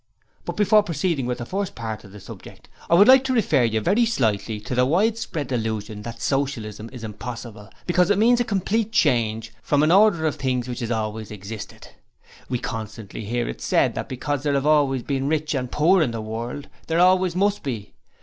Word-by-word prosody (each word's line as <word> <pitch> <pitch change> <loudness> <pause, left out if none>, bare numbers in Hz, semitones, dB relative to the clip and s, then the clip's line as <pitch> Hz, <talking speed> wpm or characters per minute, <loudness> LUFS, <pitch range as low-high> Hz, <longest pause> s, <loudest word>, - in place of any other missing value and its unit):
But - - -5
before 210 +1 +5
proceeding 165 -7 -1
with 125 - -2
the 120 - -6
first 195 +6 -3
part 110 -2 -5
of 100 - -14
the 105 - -11
subject, - - -12 0.2
I 170 - +5
would 200 +4 +7
like 260 0 +8
to 260 - 0
refer 145 - +2
very 205 - +3
slightly 110 - -1
to 105 - -6
the 125 0 +3
widespread 180 - 0
delusion 110 -3 -3
that 115 +1 -8
Socialism 115 -6 -2
is 125 -3 -10
impossible 110 0 -8 0.2
because 180 0 +2
it 205 - +3
means 240 +3 +4
a - - +3
complete 220 +1 -1
change 115 - +1
from 145 +4 +2
an 155 - +3
order 195 -4 +5
of 155 - 0
things 125 -2 -1
which 125 -1 -5
has 115 -3 -3
always 110 -2 -3
existed. 105 +1 -9 0.6
We 125 - 0
constantly 110 -2 -6
hear 120 +2 -2
it - - -6
said - - +2
that - - -5
because 140 +2 -3
there 145 0 0
have 140 0 0
always 140 -4 +3
been 135 -1 -2
rich 155 0 0
and 125 -3 -3
poor 175 +5 +4
in 155 - +2
the 115 -1 -4
world, 115 +6 -5 0.2
there 165 - 0
always 185 0 +4
must 200 +2 +1
be. 115 -7 -5
135 Hz, 200 wpm, -23 LUFS, 115-180 Hz, 0.6 s, like